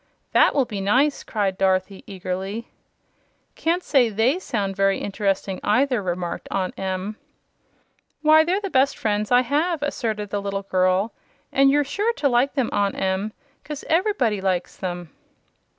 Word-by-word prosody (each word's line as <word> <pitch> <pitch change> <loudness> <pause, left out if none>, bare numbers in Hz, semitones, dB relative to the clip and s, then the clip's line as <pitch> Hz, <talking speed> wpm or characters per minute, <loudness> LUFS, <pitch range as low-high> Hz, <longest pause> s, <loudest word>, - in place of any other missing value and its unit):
"That - - +4
will 275 -3 +3
be 205 -4 -5
nice!" 260 +9 +2
cried 200 -4 -2
Dorothy, 190 0 0
eagerly. 195 +3 -5 0.8
"Can't 345 +3 0
say 255 -5 +3
THEY 225 - +1
sound 200 - -2
very 195 0 +2
interesting, 195 -1 -2
either," 250 +2 +2
remarked 175 -2 -4
Aunt 190 -2 -1
Em. 190 +2 -3 1.1
"Why, 310 +1 +7
they're 360 +4 +1
the 395 -2 -5
best 265 +1 +3
friends 210 -1 -1
I 245 0 +6
have!" 295 +5 0
asserted 215 -7 -2
the 205 - -1
little 200 0 -3
girl, 185 +2 +1 0.4
"and 275 0 +5
you're 290 +1 +3
sure 410 - -1
to 295 - 0
like 255 +2 +2
them, 265 -5 +1
Aunt 200 -1 +1
Em, 190 +3 -1 0.3
'cause 300 -2 -7
EVER'body 325 - +1
likes 185 -2 -1
them." 175 -4 -5
210 Hz, 150 wpm, -23 LUFS, 195-275 Hz, 1.1 s, Why